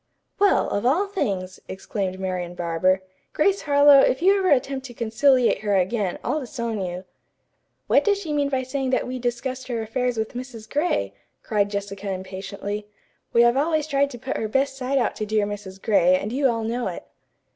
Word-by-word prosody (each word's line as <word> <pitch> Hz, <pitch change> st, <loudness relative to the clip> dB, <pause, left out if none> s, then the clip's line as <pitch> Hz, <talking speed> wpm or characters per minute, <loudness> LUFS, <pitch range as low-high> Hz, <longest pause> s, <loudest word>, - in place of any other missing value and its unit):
"Well, 405 Hz, 0 st, +4 dB
of 205 Hz, -, -1 dB
all 300 Hz, +11 st, +3 dB
things!" 200 Hz, -, -3 dB
exclaimed 190 Hz, 0 st, -4 dB
Marian 180 Hz, -2 st, -3 dB
Barber. 175 Hz, +2 st, +1 dB, 0.3 s
"Grace 395 Hz, +5 st, +2 dB
Harlowe, 285 Hz, -1 st, +6 dB
if 265 Hz, -, +3 dB
you 390 Hz, +2 st, +6 dB
ever 375 Hz, -1 st, +1 dB
attempt 270 Hz, 0 st, +1 dB
to 240 Hz, -, -12 dB
conciliate 240 Hz, +3 st, +3 dB
her 205 Hz, -2 st, 0 dB
again, 190 Hz, 0 st, 0 dB
I'll 305 Hz, -, 0 dB
disown 235 Hz, -5 st, -4 dB
you." 180 Hz, +1 st, -5 dB, 0.8 s
"What -, -, +4 dB
does 410 Hz, -1 st, +2 dB
she 335 Hz, -7 st, -4 dB
mean 285 Hz, -1 st, +1 dB
by 265 Hz, -2 st, 0 dB
saying 265 Hz, +1 st, -2 dB
that 260 Hz, -, +1 dB
we 255 Hz, 0 st, -4 dB
discussed 250 Hz, +2 st, -3 dB
her 240 Hz, -2 st, -2 dB
affairs 245 Hz, +2 st, -1 dB
with 220 Hz, 0 st, -2 dB
Mrs. 245 Hz, -3 st, -8 dB
Gray?" 295 Hz, +8 st, 0 dB, 0.3 s
cried 205 Hz, -3 st, +1 dB
Jessica 200 Hz, 0 st, -4 dB
impatiently. 195 Hz, +2 st, -5 dB, 0.4 s
"We 235 Hz, -, +5 dB
have 240 Hz, +1 st, +4 dB
always 310 Hz, +1 st, +1 dB
tried 280 Hz, -2 st, +1 dB
to 250 Hz, -, -8 dB
put 260 Hz, +3 st, -4 dB
her 220 Hz, -, -2 dB
best 270 Hz, +4 st, 0 dB
side 270 Hz, +1 st, -1 dB
out 255 Hz, -, +1 dB
to 215 Hz, -, -2 dB
dear 215 Hz, -1 st, +1 dB
Mrs. 200 Hz, -2 st, -7 dB
Gray, 185 Hz, -4 st, +4 dB
and 210 Hz, +5 st, -4 dB
you 275 Hz, +1 st, +2 dB
all 230 Hz, -1 st, -1 dB
know 235 Hz, +2 st, -2 dB
it." -, -, -5 dB
235 Hz, 190 wpm, -24 LUFS, 200-275 Hz, 0.8 s, Harlowe